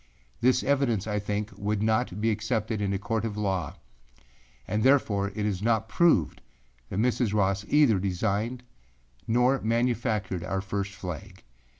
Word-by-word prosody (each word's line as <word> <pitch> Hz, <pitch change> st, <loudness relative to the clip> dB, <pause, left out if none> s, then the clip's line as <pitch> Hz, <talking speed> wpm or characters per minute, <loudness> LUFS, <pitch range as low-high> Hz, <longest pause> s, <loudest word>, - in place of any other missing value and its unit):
This 125 Hz, +1 st, +3 dB
evidence, 130 Hz, -8 st, +1 dB
I 105 Hz, -1 st, -1 dB
think, 105 Hz, +1 st, -3 dB
would 105 Hz, +1 st, -1 dB
not 110 Hz, -2 st, 0 dB
be 110 Hz, +1 st, +2 dB
accepted 110 Hz, 0 st, -1 dB
in 100 Hz, -1 st, 0 dB
a 100 Hz, -, 0 dB
court 110 Hz, +2 st, -2 dB
of 110 Hz, -2 st, -3 dB
law, 95 Hz, -6 st, -1 dB, 0.9 s
and 105 Hz, +3 st, -1 dB
therefore 110 Hz, -7 st, +3 dB
it 105 Hz, -1 st, -1 dB
is 100 Hz, -3 st, -1 dB
not 110 Hz, 0 st, +1 dB
proved 110 Hz, -, +2 dB, 0.5 s
that -, -, -4 dB
Mrs. 115 Hz, -1 st, +1 dB
Ross 100 Hz, 0 st, +1 dB
either 145 Hz, -9 st, +4 dB
designed 105 Hz, +6 st, -1 dB, 0.7 s
or 125 Hz, +3 st, +3 dB
manufactured 115 Hz, -5 st, 0 dB
our 95 Hz, +1 st, -2 dB
first 100 Hz, +1 st, -3 dB
flag. 95 Hz, 0 st, -8 dB
105 Hz, 150 wpm, -27 LUFS, 100-115 Hz, 0.9 s, either